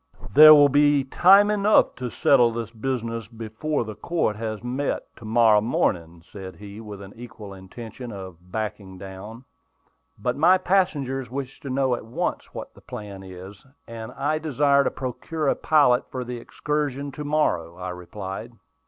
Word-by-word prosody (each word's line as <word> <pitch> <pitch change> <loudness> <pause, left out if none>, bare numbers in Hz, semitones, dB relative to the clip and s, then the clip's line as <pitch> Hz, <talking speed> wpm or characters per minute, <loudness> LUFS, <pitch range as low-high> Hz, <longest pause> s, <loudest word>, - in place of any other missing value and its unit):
"There 155 +2 +10
will 145 -1 +7
be 145 0 +3
time 195 +9 +5
enough 210 0 +3
to 125 -1 -4
settle 120 -1 +4
this 115 0 -5
business 115 -1 -3
after 115 +6 -3
the 110 -1 -7
court 160 -3 -1
has 110 0 -5
met 130 +4 -3
to 115 - -12
morrow 110 -1 +4
morning," 85 -7 -1
said 95 0 -10
he, 105 +1 -10
with 105 -2 -9
an 95 - -11
evident 110 -4 -10
intention 115 +5 -9
of 95 -3 -10
"backing 105 -3 -5
down." 100 +6 -10 0.7
"But 120 +4 -2
my 180 +5 +5
passengers 140 -10 0
wish 135 +1 -6
to 140 - -8
know 130 -1 +1
at 120 - -3
once 115 - -3
what - - -8
the - - -18
plan 100 -2 -8
is, 95 +1 -11 0.2
and 115 -1 -8
I 155 +2 -1
desire 140 -2 +2
to - - +2
procure 145 +4 -4
a - - +3
pilot 140 -6 +3
for 130 - -4
the 125 0 -6
excursion 145 +2 -3
to 150 +3 -7
morrow," 145 - 0
I 90 0 -5
replied. 95 +5 -7
120 Hz, 165 wpm, -24 LUFS, 105-140 Hz, 0.7 s, There